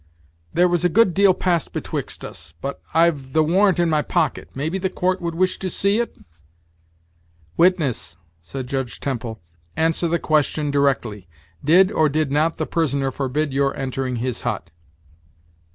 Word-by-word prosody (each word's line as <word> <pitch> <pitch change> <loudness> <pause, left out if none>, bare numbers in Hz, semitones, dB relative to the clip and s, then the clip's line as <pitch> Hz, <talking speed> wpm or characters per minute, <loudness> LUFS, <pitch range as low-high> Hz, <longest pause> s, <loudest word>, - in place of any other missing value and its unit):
"There 180 - +4
was 175 -1 +1
a 180 - +4
good 195 0 +4
deal 200 +1 +5
passed 175 -5 0
betwixt - - -4
us 80 -2 -9
but 140 +1 -5
I've 155 -5 +2
the 160 0 +4
warrant 185 +3 +3
in 175 - +3
my 155 -2 +2
pocket; 150 -1 -1
maybe 160 +8 -2
the 190 0 -1
court 185 0 -1
would 170 -1 -3
wish 185 +2 +1
to 190 - -3
see 200 +5 +1
it?" 235 - -3 1.4
"Witness," 150 - +2 0.2
said 130 +10 -6
Judge 135 -2 -3
Temple, 115 -5 -4 0.4
"answer 165 +1 +1
the 170 +1 +1
question 150 -2 +1
directly; 125 -9 0 0.4
did 185 +6 +5
or 155 -5 +3
did 150 -1 0
not 155 +3 +1
the - - -1
prisoner 140 -5 0
forbid 140 +2 -2
your 140 0 +1
entering 130 -1 -2
his 120 0 -3
hut?" 105 -8 -3
155 Hz, 160 wpm, -22 LUFS, 135-175 Hz, 1.4 s, deal